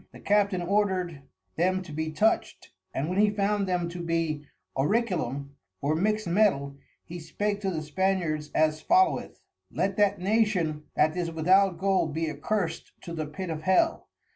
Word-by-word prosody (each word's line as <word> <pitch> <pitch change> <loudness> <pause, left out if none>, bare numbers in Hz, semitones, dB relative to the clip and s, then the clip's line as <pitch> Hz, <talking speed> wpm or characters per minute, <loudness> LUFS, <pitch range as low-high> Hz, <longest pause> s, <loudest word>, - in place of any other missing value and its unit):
The - - -13
Captain 200 -3 +2
ordered 185 -5 0 0.4
them 185 +2 +1
to 175 - -11
be 160 +1 -2
toucht, 215 +8 0 0.2
and 140 - -2
when 185 +3 -1
he 210 0 +5
found 205 -1 0
them 180 -2 0
to 175 0 -6
be 165 -3 -1 0.3
Orichalcum 150 - 0 0.3
or 145 +2 0
mixt 215 +6 0
Metal, 170 -7 +2 0.3
he 175 +1 -7
spake 205 +5 -2
to 195 - -1
the 160 -4 -3
Spaniards 155 -2 -1
as 155 0 +2
followeth. 370 +2 +2 0.3
Let 195 0 -1
that 205 -1 +3
Nation 180 -6 +1
that 155 +2 +3
is 175 -2 -1
without 180 +3 +3
Gold 185 -4 +1
be 160 -1 -1
accursed 165 +3 -3
to 170 - -7
the 155 -2 -3
Pit 165 +4 -5
of 155 -1 -4
Hell. 190 - +2
180 Hz, 165 wpm, -27 LUFS, 155-200 Hz, 0.4 s, he